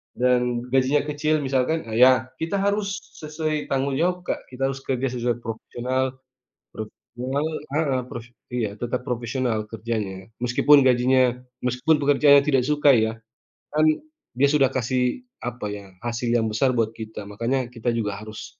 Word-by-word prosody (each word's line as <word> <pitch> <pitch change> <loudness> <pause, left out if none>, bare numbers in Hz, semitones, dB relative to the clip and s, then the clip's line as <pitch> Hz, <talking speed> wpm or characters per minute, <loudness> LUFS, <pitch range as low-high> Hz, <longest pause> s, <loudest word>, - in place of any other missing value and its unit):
dan 125 -1 +2
gajinya 135 +2 +3
kecil 155 +1 +1
misalkan, 135 +2 0
ya 130 +1 +6
kita 165 +6 -1
harus 200 +1 0 0.2
sesuai 155 0 -2
tanggung 135 0 0
jawab 180 +1 +1
Kak, - - -3
kita 135 +1 -1
harus 135 0 -6
kerja 130 0 -1
sesuai 120 -1 -1
profesional 130 +3 -3 0.5
profesional 125 +6 -4 0.3
heeh, 135 -5 +1
pros 120 -1 -7 0.2
iya 120 -4 -1
tetap 120 +1 -2
profesional 120 -2 -1
kerjanya, 105 -4 -4 0.2
meskipun 130 +4 +5
gajinya 125 0 +3 0.2
meskipun 125 +5 +2
pekerjaannya 140 0 +6
tidak 135 -3 +3
suka 145 0 +3
ya, 110 0 +1 0.6
kan 155 +1 +3 0.5
dia 140 +2 +4
sudah 145 -3 +4
kasih 125 - 0 0.2
apa 120 -3 -5
ya, 100 -1 -7 0.2
hasil 120 0 -2
yang 115 -2 +2
besar 125 +4 +2
buat 115 -1 +1
kita 110 -2 -8
makanya 120 +4 -1
kita 120 -1 -8
juga 105 -3 -2
harus 110 0 -10
125 Hz, 145 wpm, -24 LUFS, 120-140 Hz, 0.6 s, ya